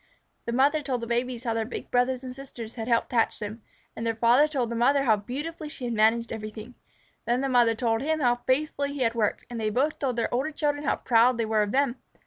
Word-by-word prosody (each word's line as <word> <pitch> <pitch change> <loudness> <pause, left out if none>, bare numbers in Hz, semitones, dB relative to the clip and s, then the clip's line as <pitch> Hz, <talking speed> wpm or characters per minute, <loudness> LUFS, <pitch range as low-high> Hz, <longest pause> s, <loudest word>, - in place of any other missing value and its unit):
The 235 - -2
mother 280 +5 +3
told 260 -4 -2
the - - -3
babies 240 +1 -2
how 230 -3 -1
their 225 0 0
big 230 - -7
brothers 250 +1 +1
and 255 -1 -7
sisters 240 -4 -8
had 225 -2 -5
helped 230 -2 +1
hatch 230 -2 +1
them, 215 +1 -6 0.3
and 225 - -5
the 230 -1 0
father 240 +6 +4
told 260 -6 -2
the - - -2
mother 275 +4 +3
how 225 -5 +4
beautifully 295 +9 -6
she 280 -4 -7
had 240 - -2
managed 225 +2 +2
everything. 215 +2 -7 0.5
Then 240 +2 +1
the 275 - 0
mother 240 -3 +4
told 225 -1 0
him 315 +3 0
how 245 -3 +2
faithfully 280 +1 0
he 285 - -5
had 230 -2 +2
worked, 220 -3 -1
and 240 -1 -6
they 215 -1 0
both 270 +8 0
told 260 -4 -1
the 230 -1 0
older 260 +5 0
children 295 -1 -2
how - - +2
proud 240 +1 +3
they 230 - 0
were 220 -1 +1
of 205 -1 -1
them. 270 -1 +1
245 Hz, 245 wpm, -26 LUFS, 230-275 Hz, 0.5 s, father